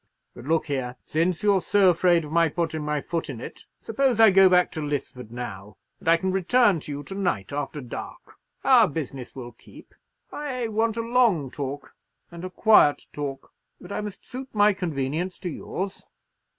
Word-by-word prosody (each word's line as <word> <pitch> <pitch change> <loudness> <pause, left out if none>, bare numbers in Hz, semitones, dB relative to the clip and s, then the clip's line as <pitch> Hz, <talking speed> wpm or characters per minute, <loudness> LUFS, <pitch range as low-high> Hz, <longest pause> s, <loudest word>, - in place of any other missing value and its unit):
But 120 - -12
look 160 +2 +1
here, 130 -4 -3
since 170 +3 0
you're 200 -2 +3
so 195 0 +4
afraid 170 -1 +2
of 150 - -10
my 165 0 +3
putting 160 -1 -2
my 150 -1 -1
foot 165 0 -3
in 130 -5 -6
it, - - -9 0.2
suppose 245 0 +1
I 220 -2 +8
go 190 0 +7
back 180 0 +4
to - - -5
Lisford 140 -5 -4
now, 105 -4 -8 0.2
and - - -13
I 165 - +6
can 190 +2 -1
return 195 +1 +3
to 150 - -7
you 145 0 -5
to 195 - -7
night 180 - -2
after 145 +1 -4
dark. 125 - -9 0.3
Our 245 -5 +6
business 140 -5 -6
will 120 -2 -8
keep. 115 - -17 0.4
I 255 -6 -4
want 225 +1 0
a - - 0
long 230 - +2
talk, 140 -1 -6 0.4
and 170 0 -9
a 185 - -4
quiet 185 -6 +4
talk; 140 -2 -6 0.3
but - - -12
I - - -2
must 210 -2 -8
suit 260 +1 -8
my 205 0 +5
convenience 165 0 -3
to 180 - -5
yours. 190 +4 -5
170 Hz, 190 wpm, -25 LUFS, 140-200 Hz, 0.4 s, I